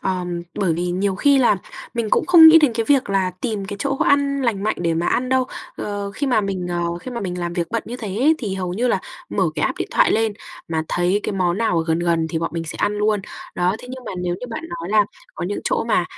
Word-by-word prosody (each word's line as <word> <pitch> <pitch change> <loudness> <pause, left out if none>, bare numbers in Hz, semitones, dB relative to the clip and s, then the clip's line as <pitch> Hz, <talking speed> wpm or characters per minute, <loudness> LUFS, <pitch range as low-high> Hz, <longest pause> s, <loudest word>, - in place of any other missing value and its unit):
ờm, 180 -2 -2
bởi 185 -4 +1
vì 175 +2 -2
nhiều 190 +2 0
khi 280 +7 +4
là 235 -6 +4 0.4
mình 230 -3 -2
cũng - - +2
không 335 -3 +9
nghĩ 325 +1 +9
đến 295 -6 +3
cái 230 -1 0
việc 270 -7 +3
là 190 -2 +1
tìm 215 -5 -2
cái 200 +1 -6
chỗ 275 +2 -1
ăn 280 -1 +2
lành 215 -5 0
mạnh 215 - 0
để 170 -1 0
mà 170 +2 -1
ăn 250 +1 +1
đâu. 260 0 +2 0.3
Ờ, 205 -1 -4
khi 285 - -2
mà 245 -5 +3
mình, 190 -3 -3
ờ, 170 0 -2
khi 255 - -7
mà 235 - -4
mình 180 -2 -4
làm 175 -1 -3
việc 170 -1 -1
bận 230 - -1
như 245 +2 -5
thế 220 -5 -6
ấy 305 +5 +4
thì 200 -6 -3
hầu 180 -2 -3
như 245 +4 0
là - - +1 0.3
mở - - +1
cái - - -2
app - - -2
điện - - -3
thoại - - +4
lên 225 -1 +1 0.4
mà 160 -1 -1
thấy 180 +4 +1
cái - - -2
món 185 -1 0
nào 200 -7 +1
ở 165 - 0
gần 160 0 +1
gần 170 -1 +1
thì 165 - -1
bọn 165 - -2
mình 165 0 -2
sẽ 155 - -6
ăn 205 - +1
luôn. 210 -1 +2 0.3
Đó, 180 +3 +1
thế 250 - -12
nhưng 255 -1 -8
mà - - -5
nếu 175 0 0
như 250 - -5
bạn 225 - -5
nói 170 0 -6
là 210 -1 +5 0.3
có - - -4
những 205 +3 -3
chỗ - - 0
mà, 220 -6 +2
200 Hz, 280 wpm, -21 LUFS, 175-245 Hz, 0.4 s, không